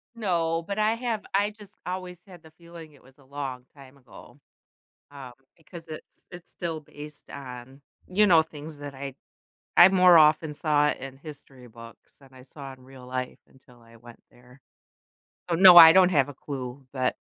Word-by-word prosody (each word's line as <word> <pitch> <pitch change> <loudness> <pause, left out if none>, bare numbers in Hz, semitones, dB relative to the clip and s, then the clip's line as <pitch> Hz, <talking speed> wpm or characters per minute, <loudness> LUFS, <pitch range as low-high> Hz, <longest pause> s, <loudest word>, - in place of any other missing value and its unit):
No. 170 -6 -2
But 200 +4 -6
I 215 +1 +1
have 230 -3 -4
I 205 +1 +1
just 210 -1 -18
always 180 -1 -7
had 180 -4 -16
the 160 - -17
feeling 170 -1 -15
it 145 - -22
was 135 +1 -23
a 140 - -22
long 135 -2 -7
time 135 -1 -17
ago, 130 -3 -17 0.7
um, 135 -3 -12 0.2
because 165 +1 -14
it's 155 -1 -13
it's 175 0 -13
still 165 -3 -6
based 150 0 -14
on, 130 0 -11 0.3
you 210 +3 +2
know, 165 -4 +5
things 155 -1 -12
that 145 -1 -9
I 135 0 -8 0.6
I 175 - +8
more 180 -2 +5
often 155 0 +2
saw 150 -1 +1
in 135 -2 -9
history 135 -3 -14
books 115 0 -16
than 135 -1 -20
I 130 -1 -16
saw 135 +1 -12
in 130 -1 -22
real 130 -1 -15
life 130 0 -6
until 125 -2 -23
I 115 0 -20
went 120 0 -17
there. 125 +2 -21 0.9
So, 170 - -1
no, 185 0 +8
I 165 -1 +11
don't 185 0 +4
have 145 -6 +1
a 145 - -10
clue, 135 -1 -9
but 130 -2 -2
150 Hz, 185 wpm, -25 LUFS, 130-175 Hz, 0.9 s, I